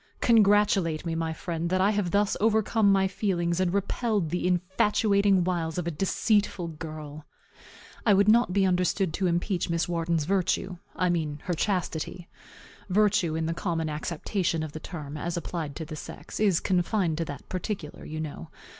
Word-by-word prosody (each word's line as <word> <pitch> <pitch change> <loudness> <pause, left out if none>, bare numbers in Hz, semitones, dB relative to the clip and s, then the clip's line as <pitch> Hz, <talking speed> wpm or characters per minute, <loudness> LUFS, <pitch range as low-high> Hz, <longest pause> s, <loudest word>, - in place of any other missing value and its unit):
Congratulate 205 -7 +3
me, 165 - -1
my 165 0 -1
friend, 165 +1 -3
that 185 +1 +1
I 195 +3 +4
have 205 -4 0
thus 200 +2 +2
overcome 220 -1 +3
my 195 -1 +3
feelings, 180 -3 -1
and 185 -2 +1
repelled 200 -2 0
the 180 0 0
infatuating 195 +2 +2
wiles 170 -2 -1
of 175 - -2
a 170 - -1
deceitful 195 +1 0
girl. 155 -1 -8 0.8
I 210 -3 +5
would 200 +1 +4
not 230 -2 +5
be 195 +1 +3
understood 180 -1 +1
to 190 +1 0
impeach 175 +1 0
Miss 170 0 0
Wharton's 170 -2 0
virtue; 185 0 0 0.2
I 180 - +1
mean 155 -4 -2
her 180 - -1
chastity. 175 -1 -2 0.6
Virtue, 195 -4 +2
in 160 0 -1
the 165 - -1
common 165 -3 -2
acceptation 165 +2 -2
of 155 - -5
the 155 - -7
term, 155 -4 -7
as 170 +3 -3
applied 160 -4 -4
to 160 - -5
the 155 0 -7
sex, - - -8
is 200 -5 +3
confined 180 -2 0
to 165 - 0
that 145 -3 -8
particular, 185 -4 -5
you 155 0 -6
know. 145 - -6
175 Hz, 170 wpm, -27 LUFS, 160-200 Hz, 0.8 s, I